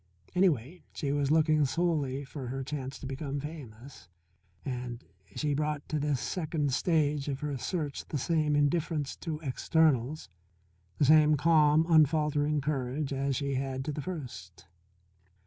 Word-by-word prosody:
Anyway, 175 - +1
she 140 -3 -2
was 145 -1 0
looking 155 -1 +4
solely 145 -3 0
for 135 -2 -7
her 135 +2 -3
chance 135 -1 -5
to - - -9
become 135 +1 -4
famous, 135 - -9 0.6
and 125 -2 -5 0.3
she 150 -2 0
brought 150 0 -2
to 155 - -1
this 145 -2 0
second 155 -5 -2
stage 150 -2 +1
of 140 0 -3
her 150 -2 -2
search 145 +4 -3
the 150 - -2
same 155 +1 +1
indifference 145 0 0
to 160 -3 -5
externals, 150 -1 +1 0.7
the 145 - +3
same 155 +1 +6
calm, 155 0 +4
unfaltering 150 -2 +3
courage 140 0 -2
as 135 0 -1
she 140 +1 -1
had 135 0 -2
to 150 - -2
the 150 - -4
first. 125 - -7
145 Hz, 145 wpm, -30 LUFS, 135-155 Hz, 0.7 s, same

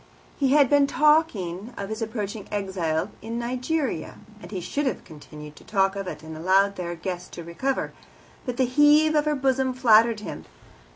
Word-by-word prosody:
He 270 -1 +2
had 290 -2 +6
been 285 +1 +4
talking 245 - +1
of 200 0 -5
his 220 +1 -5
approaching 215 -2 -4
exile 190 -3 -2
in 230 +2 -5
Nigeria, 250 - -2 0.3
and - - -10
he 195 - -4
should 280 +11 -2
have 240 - -3
continued 150 -1 -12
to - - -14
talk 195 -2 +1
of 195 -1 -5
it, 170 - -7
and 160 0 -8
allowed 190 +4 +2
their 175 -2 -4
guest 180 +1 -6
to 170 - -7
recover. 215 +12 -2 0.5
But 250 -1 -4
the 260 - +3
heave 295 +4 +4
of 300 -1 +2
her 300 0 +1
bosom 265 -1 0
flattered 230 -2 +4
him. - - -7
220 Hz, 180 wpm, -25 LUFS, 185-270 Hz, 0.5 s, had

